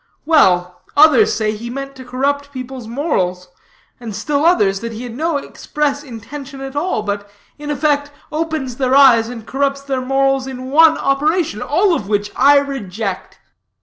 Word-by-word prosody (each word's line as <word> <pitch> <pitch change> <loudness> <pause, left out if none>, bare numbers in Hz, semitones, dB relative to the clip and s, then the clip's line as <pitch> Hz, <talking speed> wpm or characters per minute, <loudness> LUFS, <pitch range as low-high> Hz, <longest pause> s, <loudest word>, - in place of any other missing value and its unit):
"Well, 180 - +3 0.2
others 300 -4 +6
say 215 -1 0
he 235 +3 -7
meant 275 +2 -6
to 260 - -9
corrupt 280 +3 -2
people's 255 -3 -7
morals; 185 - -2 0.5
and 225 -4 -7
still 285 +7 -1
others, 205 - +3
that 230 +1 -6
he 225 +3 -7
had 245 -2 -7
no 320 +2 0
express 285 0 -3
intention 275 +2 -9
at 270 0 -7
all, 295 -7 -1
but 205 0 -4 0.3
in 295 0 -7
effect 290 0 0 0.2
opens 310 -6 -3
their 260 -1 +1
eyes 240 -5 +6
and 230 -3 -8
corrupts 275 +1 -1
their 270 -2 -3
morals 270 0 +1
in 260 0 -7
one 320 +2 +6
operation. 290 - 0
All 350 +9 +2
of 210 -11 -2
which 205 0 -1
I 285 +2 +6
reject." 220 -8 -4
270 Hz, 165 wpm, -17 LUFS, 225-290 Hz, 0.5 s, others